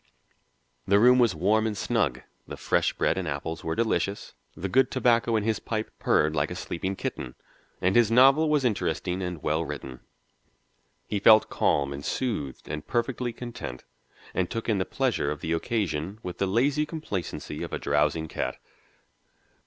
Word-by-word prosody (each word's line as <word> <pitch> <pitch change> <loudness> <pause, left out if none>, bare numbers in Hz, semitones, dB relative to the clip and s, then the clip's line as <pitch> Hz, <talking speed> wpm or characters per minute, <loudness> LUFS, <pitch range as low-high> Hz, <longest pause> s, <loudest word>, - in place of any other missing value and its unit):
The 100 - +5
room 125 +4 +6
was 120 -7 +3
warm 105 +7 +2
and 105 -2 -3
snug, 90 - 0 0.2
the - - -7
fresh - - +1
bread 95 - 0
and 90 - -4
apples 75 +3 -4
were 80 0 -2
delicious, 105 -3 -1 0.2
the 95 - -3
good 130 +6 +3
tobacco 120 -3 +2
in 110 - +1
his 110 -1 0
pipe 110 -1 -3
purred 75 +1 +2
like 75 -1 +1
a - - -5
sleeping 95 +3 -4
kitten, 65 -8 -5 0.5
and 90 +1 +2
his 120 -3 +5
novel 135 +6 +6
was 150 -3 +2
interesting 95 -4 -1
and 90 -4 -5
well 80 +2 +1
written. 70 -4 -7 1.1
He 105 - -2
felt 110 +2 +6
calm 70 -1 +1
and 70 0 -7
soothed 75 - -3
and 75 0 -5
perfectly 120 0 -1
content, 115 - -7 0.5
and 90 -1 0
took 115 -1 -4
in 110 -4 +1
the 95 - 0
pleasure 130 - 0
of 75 0 -4
the 80 - -1
occasion 90 -1 -2
with 90 -1 -6
the 100 - +1
lazy 140 +9 +1
complacency 150 - -5
of - - -5
a - - -2
drowsing 75 +2 +1
cat. - - -3
100 Hz, 170 wpm, -27 LUFS, 80-120 Hz, 1.1 s, room